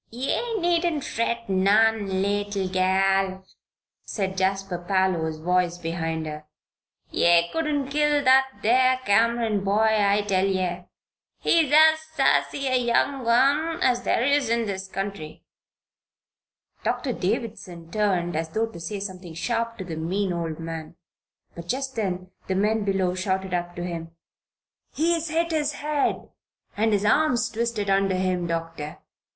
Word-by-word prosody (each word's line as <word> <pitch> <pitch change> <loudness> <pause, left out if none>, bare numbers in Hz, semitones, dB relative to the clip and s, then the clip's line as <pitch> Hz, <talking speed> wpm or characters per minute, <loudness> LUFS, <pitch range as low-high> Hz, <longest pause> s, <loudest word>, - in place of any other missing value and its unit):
"Ye 275 - -2
needn't 340 -4 +1
fret 230 0 -2
none, 200 0 +2
leetle 205 -1 -1
gal," 190 0 +1 0.6
said 190 -3 -3
Jasper 190 -1 -1
Parloe's 175 -4 0
voice, 175 +1 0
behind 165 -1 -3
her. 150 0 -7 0.7
"Ye 170 0 +4
couldn't 300 -4 -1
kill 295 0 +2
that 265 0 +5 0.2
there 255 +3 +4
Cameron 225 0 +2
boy, 210 +3 +3
I 205 0 +2
tell 195 -1 +1
ye! 185 -2 -2 0.5
He 330 -3 +3
is - - -7
as 315 0 +6 0.2
sassy 275 0 +2
a 260 -1 +1
young'un 270 +6 +2
as 245 -1 +2
there 235 - +1
is 280 -2 +2
in 235 0 +1
this 195 -2 -4
county." 190 -5 -6 1.4
Doctor 260 -4 -1
Davison 185 -6 -4
turned 185 -6 0
as 160 +1 -2
though 220 +7 0
to 225 -7 -10
say 200 +5 -5
something 185 -4 -7
sharp 230 +6 -2
to 190 - -5
the 165 -3 -6
mean 185 +4 -1
old 165 -2 -4
man; 165 0 -7 0.6
but 170 0 -10
just 265 +4 -3
then 185 -4 -3 0.2
the 190 - -1
men 210 +2 +1
below 195 -2 0
shouted 190 0 -2
up 175 0 -2
to 175 - -5
him: 170 -2 -5 0.8
"He's 330 +1 0
hit 335 +2 0
his 300 -2 0
head 295 -1 -1 0.5
and 220 +2 +1
his 205 0 +1
arm's 245 -1 +2
twisted 230 -2 -2
under 195 -1 +2
him, 185 -1 -1
Doctor. 165 -2 -4
200 Hz, 140 wpm, -25 LUFS, 180-245 Hz, 1.4 s, as